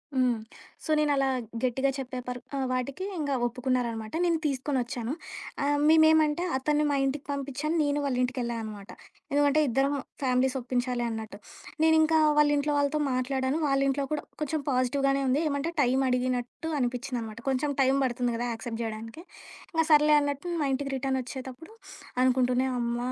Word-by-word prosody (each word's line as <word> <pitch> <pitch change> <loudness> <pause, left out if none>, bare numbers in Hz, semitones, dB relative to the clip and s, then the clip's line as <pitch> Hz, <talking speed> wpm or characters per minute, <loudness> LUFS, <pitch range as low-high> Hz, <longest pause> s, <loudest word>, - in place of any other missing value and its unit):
హ్మ్. 250 -3 +2 0.5
సో - - -3
నేను 300 -1 +2
అలా 275 -1 +2 0.4
గట్టిగా 265 +2 +1
చెప్పే 260 -1 -5
పర్ 250 0 -3 0.3
వాటికి 255 +7 -2
ఇంక 295 -3 -2 0.2
ఒప్పుకున్నారనమాట 240 -3 -2
నేను 340 -2 +2
తీసుకొనొచ్చాను. 255 -3 -1 0.5
ఆహ్, 290 +1 +2
మేమేంమంటే 315 0 +5
అతన్ని 300 +3 +1
మా - - +1
ఇంటికి 275 +1 -2
పంపించాను, 280 +3 -2
నేను 290 0 0
వాళ్ళింటికి 250 -1 0
వెళ్ళా 235 0 -2
అనమాట. 210 -2 -8 0.4
ఎందుకంటే 290 +1 +3
ఇద్దరం 270 +3 +1 0.3
ఫ్యామిలీస్ 260 0 +2
ఒప్పించాలి 245 0 -1
అన్నట్టు. 220 -1 -6 0.5
నేనింకా 320 0 +5 0.2
వాళ్ళ 300 0 +5
ఇంట్లో 295 +1 0
వాళ్ళతో 285 +1 +1
మాట్లాడాను, 260 +2 0
వాళ్ళ 275 -1 +2
ఇంట్లో 275 +1 0
కూడా 305 - -1 0.2
కొంచెం 305 +1 -1
పాజిటివ్‌గానే 275 +2 +1
ఉంది. 260 +3 +2
ఏమంటే 285 +3 -2
టైం 255 -1 +2
అడిగినట్టు 250 +4 -1
అనిపించింది 250 0 -2
అనమాట. 220 0 -7
కొంచెం 270 +3 0
టైం 265 0 +4
పడుతుంది 245 -1 -1
కదా! 240 - -2
యాక్సెప్ట్ 230 0 -5
చేయడానికి, 225 +6 -6 0.5
ఇంగ 325 0 +3
సర్లే 300 0 +6
అన్నట్టు 285 +3 -3 0.2
మా - - +1
ఇంటికి 275 +1 -2
రిటర్న్ 265 0 -1
వచ్చేటప్పుడు. 260 - -8 0.5
అనుకుంటూనే, 255 0 +2
అమ్మ 235 0 -1
265 Hz, 150 wpm, -28 LUFS, 250-290 Hz, 0.5 s, సర్లే